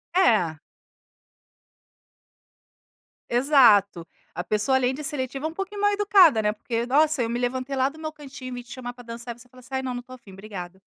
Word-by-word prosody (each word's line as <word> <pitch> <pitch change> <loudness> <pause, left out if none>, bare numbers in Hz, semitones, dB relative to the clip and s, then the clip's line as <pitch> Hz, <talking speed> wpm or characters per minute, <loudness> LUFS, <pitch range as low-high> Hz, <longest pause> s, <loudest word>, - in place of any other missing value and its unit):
É. 180 - +3 2.7
Exato, 235 - +4 0.3
a 175 - -4
pessoa 215 +7 +1
além 255 0 +1
de 295 +3 -6
seletiva, 275 0 -3
é - - 0
um - - -10
pouquinho 390 +3 -5
mal-educada, 405 - +5
né, 210 0 +1
porque 230 +2 -3
nossa, 300 +1 +3
eu 230 - -1
me 240 - -2
levantei 255 +2 -2
lá 260 0 +2
do 310 +3 -9
meu 310 0 -5
cantinho, 275 -4 -10
e - - -8
vim 245 - -6
te 240 - -17
chamar 245 -2 -6
para 245 0 -14
dançar, 235 0 -8
você 250 - -16
fala 255 +1 -18
assim: 250 - -16
"Ai 265 - 0
não 255 -1 -3
não 245 - -4
estou 255 +1 -12
afim 200 -6 -16
obrigada". 190 -2 -9
250 Hz, 195 wpm, -25 LUFS, 230-280 Hz, 2.7 s, mal-educada